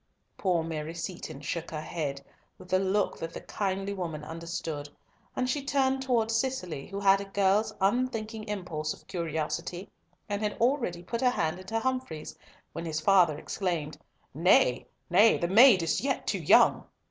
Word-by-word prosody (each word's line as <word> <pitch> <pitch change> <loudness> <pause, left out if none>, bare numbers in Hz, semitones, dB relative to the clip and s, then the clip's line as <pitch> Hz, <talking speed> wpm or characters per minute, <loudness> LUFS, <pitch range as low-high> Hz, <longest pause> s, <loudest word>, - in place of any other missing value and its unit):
Poor 180 -4 +1
Mary 160 0 -5
Seaton 165 -4 -6
shook 165 +3 -4
her 155 -1 -5
head, 145 -3 -4 0.3
with 185 0 -10
a 185 - +5
look 195 +1 0
that 165 - -5
the - - -7
kindly 195 0 -2
woman 165 -6 -4
understood, 160 -2 -5 0.5
and 255 - 0
she 280 +2 -1
turned 270 -1 +1
towards 230 -4 +1
Cicely, 185 - -2
who 195 0 -5
had 195 0 +4
a - - -6
girl's 200 +2 +2
unthinking 220 +1 0
impulse 170 -7 -3
of - - -21
curiosity, 170 +2 -3 0.4
and 205 -1 -2
had 210 -1 -2
already 235 -9 +1
put 230 +6 -4
her 255 - +4
hand 170 -7 -1
into 220 +5 -3
Humfrey's, 255 -11 -3 0.4
when 170 - -5
his 155 -1 -2
father 175 -4 +4
exclaimed, 165 -3 -3 0.3
"Nay, 150 -5 +3 0.2
nay, 205 +6 +5
the 170 - -1
maid 210 -1 +7
is 165 - 0
yet 270 0 -1
too - - -1
young!" - - +5
185 Hz, 165 wpm, -29 LUFS, 165-220 Hz, 0.5 s, maid